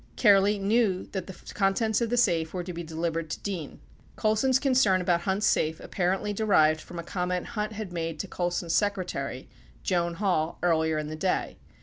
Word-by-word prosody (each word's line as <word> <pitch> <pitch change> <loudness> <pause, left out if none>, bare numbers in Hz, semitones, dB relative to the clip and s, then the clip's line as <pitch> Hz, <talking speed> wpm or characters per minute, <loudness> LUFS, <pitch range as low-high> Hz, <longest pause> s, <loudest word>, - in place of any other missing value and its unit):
Kehrli 205 -1 +5
knew 200 -2 +1
that 190 -3 -4
the 190 - -10
contents 210 +3 +1
of 235 - 0
the 245 - 0
safe 165 -8 +2
were 180 - -2
to 180 0 -6
be 170 - -5
delivered 165 0 -3
to - - -4
Dean. 180 -7 -4
97 - - -17 0.4
Colson's 220 +5 +2
concern 255 -8 +3
about 175 -1 +1
Hunt's 190 +3 0
safe 160 +1 +1
apparently 190 +3 -1
derived 155 -8 +3
from 175 - -10
a 170 - -4
comment 180 0 -2
Hunt 210 0 -3
had 210 -4 -6
made 165 -2 -3
to 195 - -7
Colson's 175 -2 -2
secretary, 180 -10 -1 0.4
Joan 170 -1 0
Hall, 170 -5 0
earlier 160 -2 +2
in 155 - -2
the 155 - -5
day. 185 +4 -1
180 Hz, 190 wpm, -27 LUFS, 165-205 Hz, 0.4 s, Kehrli